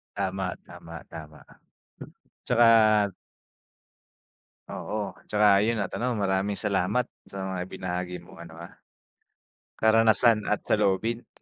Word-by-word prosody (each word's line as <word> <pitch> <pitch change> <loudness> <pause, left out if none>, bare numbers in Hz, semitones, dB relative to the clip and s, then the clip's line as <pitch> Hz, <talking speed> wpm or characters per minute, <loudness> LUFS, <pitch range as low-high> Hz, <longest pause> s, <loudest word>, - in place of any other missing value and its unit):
Tama, 95 -2 -3
tama, 85 0 -11
tama. 75 -1 -11 1.0
'Tsaka 110 -3 +4 1.6
oo, 105 -1 -5
'tsaka 105 -1 +3
'yun 115 0 0
at 100 - -3
ano 125 +1 -1
maraming 100 -2 -1
salamat, 105 +4 0 0.2
sa 100 - -9
mga 95 -1 -4
ibinahagi 90 -1 -5
mong 85 0 -16
ano 80 -1 -13
ah, - - -20 1.0
karanasan 110 0 +4
at 105 - -1
saloobin. 105 +3 0
100 Hz, 105 wpm, -26 LUFS, 95-110 Hz, 1.6 s, Tsaka